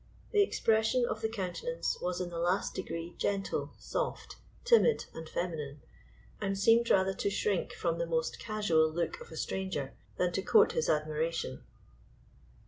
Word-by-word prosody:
The 415 - +5
expression 225 - +2
of 220 -2 -3
the 220 - 0
countenance 225 - -2
was 180 0 -1
in 180 -1 -3
the 170 - -4
last 175 +3 +1
degree 170 -2 -5
gentle, 195 -1 -1
soft, - - -4 0.3
timid, 475 -1 +5
and 160 -1 -8
feminine, 150 -6 -4 0.6
and 195 -1 -1
seemed 230 +4 +4
rather 190 0 +4
to 195 - -1
shrink 200 -2 0
from 170 -1 -1
the 170 - -1
most 160 -1 -1
casual 190 -8 +2
look 170 +1 -2
of - - -10
a 160 - -8
stranger 185 -9 -3 0.2
than 180 -1 +1
to 185 - -1
court 435 - +5
his 475 - 0
admiration. 155 - -1
185 Hz, 155 wpm, -31 LUFS, 165-220 Hz, 0.6 s, The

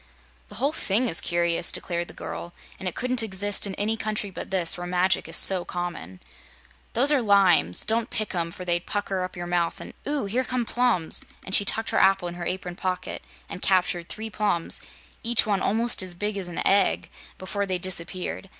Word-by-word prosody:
"The 205 - -10
whole 270 +7 0
thing 240 -4 0
is 170 - +6
curious," 170 0 0
declared 170 -1 -3
the - - -11
girl, 175 - -7 0.2
"and 190 - -5
it 180 - -2
couldn't 250 0 -1
exist 205 -1 0
in 190 - -5
any 215 +2 0
country 215 -2 -3
but - - -7
this, 180 -3 +3
where 175 0 -6
magic 180 +1 +1
is - - +4
so 185 -2 +6
common. 170 - -6 0.7
Those 270 +6 +5
are 285 -3 +3
limes. 190 - +4
Don't 225 +1 +2
pick 215 -1 -2
'em, 170 -2 -1
for 180 +2 -9
they'd 175 -1 0
pucker 200 -2 -2
up 185 - -6
your 175 - -5
mouth 175 -1 -1
and - - -9
Ooo! 290 -6 -1
here 235 +6 0
come 250 -1 -2
plums!" 240 -9 +2 0.2
and 190 - -7
she 200 - +4
tucked 225 +3 +3
her - - +2
apple 195 -2 +3
in 175 - -5
her 175 0 -6
apron 180 -1 -4
pocket 185 -1 -4 0.3
and 180 - -8
captured 180 -2 +1
three 220 +1 -6
plums 205 -6 +1 0.4
each 235 0 +2
one 200 -3 0
almost 230 +3 +3
as 185 -2 -5
big 205 +3 -2
as 195 -3 -4
an 175 - -4
egg 195 -1 +2 0.3
before 200 +2 -3
they 185 -1 0
disappeared. 185 +1 -4
190 Hz, 205 wpm, -25 LUFS, 175-215 Hz, 0.7 s, is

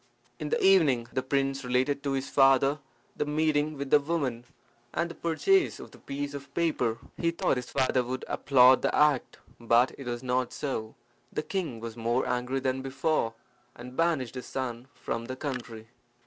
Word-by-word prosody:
In 150 - -4
the - - +1
evening 150 -12 +4
the 130 - 0
prince 135 +1 -1
related 130 +3 +1
to 140 -1 -1
his 135 0 -2
father 135 +1 +4 0.4
the - - 0
meeting 150 0 0
with 140 -1 -5
the 150 - +7
woman, 140 -6 -2 0.5
and 170 0 0
the - - -7
purchase 170 - +1
of - - -10
the - - -16
piece 140 +1 -5
of 140 -1 -8
paper. 130 -9 +1 0.2
He 170 - +1
thought 170 -4 0
his 125 -1 -5
father 130 -1 +1
would 130 +1 -4
applaud 130 -2 +5
the - - 0
act. 150 -4 +2 0.2
But 120 +2 +3
it 135 - -8
was 120 0 -4
not 125 -1 0
so. 110 -6 -4 0.4
The 150 - -2
king 160 - -3
was 115 0 -7
more 120 +2 0
angry 125 +2 -1
than 130 0 -1
before, 135 -3 -1 0.4
and 125 +1 -10
banished 160 -7 +1
his 125 -1 -7
son 125 -2 -4
from 115 0 -4
the 130 +2 -5
country. 125 -5 -6
135 Hz, 180 wpm, -28 LUFS, 125-150 Hz, 0.5 s, the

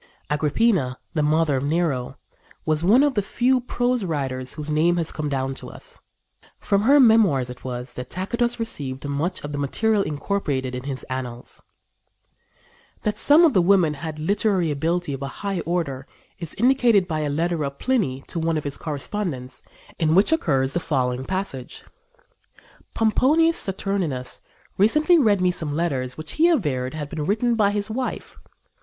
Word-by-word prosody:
Agrippina, 150 - +1 0.2
the 155 - 0
mother 150 -1 +2
of 130 - -2
Nero, 145 -4 -1 0.5
was 155 0 0
one 225 +10 +5
of 290 -2 +2
the 210 - +1
few 250 +6 +1
prose 245 -1 -1
writers 130 -6 -3
whose 150 0 -5
name 165 +3 +2
has 165 -2 -2
come 150 -1 -3
down 135 -1 -1
to - - -9
us. - - -9 0.6
From 200 0 +1
her 275 +7 +5
memoirs 205 - +4
it 125 - -12
was 125 0 -5
that 125 0 -7
Tacitus 235 +6 -1
received 145 - -4
much 145 +6 -2
of 145 - -5
the 145 - -4
material 210 +10 +1
incorporated 145 -6 -2
in 125 +1 -5
his 135 -2 -4
Annals. 125 -2 -6 1.4
That 210 - -1
some 300 +4 +6
of 310 - +3
the 185 - +4
women 175 -4 +4
had 155 +1 -6
literary 185 0 +1
ability 165 +2 -1
of 135 - -6
a 140 - -3 0.2
high 195 -2 -1
order 145 -6 -2 0.3
is 170 -4 -6
indicated 235 -5 +3
by 155 -3 -2
a 150 -1 -1
letter 165 +2 -1
of 140 0 -4
Pliny 185 - 0
to 170 - -4
one 165 0 0
of 150 - -3
his 140 -1 -2
correspondents, 145 -3 -4 0.4
in 160 -1 +2
which 195 - +4
occurs 135 - +1
the 175 - +1
following 130 -5 -1
passage: 185 -9 -4 1.1
"Pomponius 300 +9 +3
Saturninus 185 -9 -2 0.4
recently 305 - +5
read 210 -8 +3
me 180 0 +3
some 155 -4 -3
letters 135 -7 -2
which 155 0 -6
he 330 +2 +3
averred 145 - 0
had 150 -2 -4
been 155 0 -4
written 230 +4 +1
by 215 -3 +3
his 205 +1 -2
wife. 255 +3 -4
165 Hz, 170 wpm, -23 LUFS, 140-210 Hz, 1.4 s, some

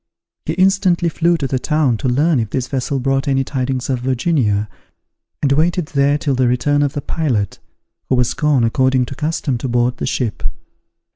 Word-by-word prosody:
He 160 - 0
instantly 185 -1 +2
flew 170 +1 +1
to 145 - -3
the 130 -1 -1
town 150 -4 +1
to 130 - -2
learn 145 +3 +2
if 110 -2 -2
this 130 +2 -2
vessel 135 +1 -2
brought 135 +1 0
any 135 -1 +2
tidings 130 -1 -2
of 130 -2 -1
Virginia, 125 -5 0 0.8
and 140 - +2
waited 160 +3 +1
there 140 0 +2
till 145 -2 -1
the 130 -1 +2
return 145 +4 +1
of 145 -1 0
the 145 - -3
pilot, 125 - -2 0.5
who 130 - +3
was 125 -1 +1
gone, 150 -5 +2
according 130 +2 +2
to 135 - -8
custom, 150 -4 -2
to 130 - -3
board 120 0 +1
the - - -3
ship. 115 -5 -2
135 Hz, 190 wpm, -18 LUFS, 125-150 Hz, 0.8 s, who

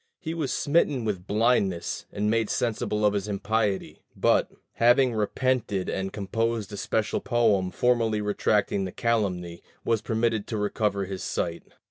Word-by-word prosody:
He 160 - -4
was 155 -6 -2
smitten 145 -5 +1
with 95 -4 -3
blindness, 105 -5 +1
and 105 +1 -1
made 110 0 +1
sensible 105 -2 0
of 105 - +4
his 100 0 -2
impiety; 105 0 -1
but, - - +3 0.2
having 120 +2 +4
repented 110 -2 0
and 95 0 -2
composed 110 +1 -2
a - - -5
special 110 +2 -1
poem 110 -7 +2
formally 115 0 +1
retracting 105 -1 +1
the 95 - -5
calumny, 90 -8 -1 0.2
was 115 -2 +1
permitted 110 -1 0
to 110 - -3
recover 105 -1 0
his 95 -1 -6
sight. 85 -1 -2
105 Hz, 145 wpm, -26 LUFS, 100-115 Hz, 0.2 s, of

